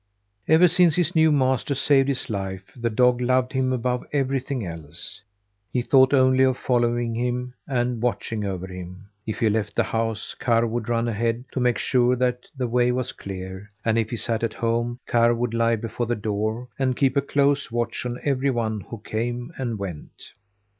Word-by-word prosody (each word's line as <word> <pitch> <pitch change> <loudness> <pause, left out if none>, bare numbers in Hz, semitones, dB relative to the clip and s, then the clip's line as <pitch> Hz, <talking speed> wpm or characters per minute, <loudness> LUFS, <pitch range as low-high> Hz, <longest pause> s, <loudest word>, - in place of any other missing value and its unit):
Ever 160 +3 +6
since 175 -2 +4
his 175 0 0
new 160 0 +5
master 130 -1 +1
saved 135 0 +3
his 135 -2 -2
life 95 -3 -5
the 120 -2 -1
dog 125 +2 +3
loved 125 +1 +1
him 130 -1 +1
above 125 0 -1
everything 135 -3 -1
else. 85 +3 -8 0.5
He 125 - 0
thought 130 +1 +5
only 130 -1 +4
of 130 -1 +3
following 120 -1 +1
him 125 +1 -2
and 125 -3 -1
watching 115 -3 -1
over 95 -2 -3
him. 90 +2 -9 0.2
If 110 - -3
he 115 - +2
left 110 0 -1
the - - +3
house, 115 -1 -2
Karr 115 -1 +2
would 115 0 -3
run 115 0 +1
ahead 115 +2 -1
to - - -3
make 125 -3 +2
sure 125 +1 +2
that 125 0 -1
the 130 - -1
way 120 +1 +2
was 125 +1 -2
clear, 95 +1 -8 0.2
and 110 -1 +2
if 110 -1 -1
he 120 - -3
sat 115 +1 -1
at 115 - -1
home, 120 +1 -1
Karr 120 0 +3
would 120 0 -2
lie 115 0 +2
before 115 +2 -4
the 120 - 0
door 110 +3 -2
and 130 -2 +1
keep 135 -2 +2
a 140 - +4
close 140 +1 +1
watch 120 0 -2
on 125 -1 -3
every 140 -1 +1
one 110 -4 -1
who 115 - -8
came 120 +7 -3
and 120 -4 -2
went. 95 -6 -8
120 Hz, 190 wpm, -24 LUFS, 110-130 Hz, 0.5 s, Ever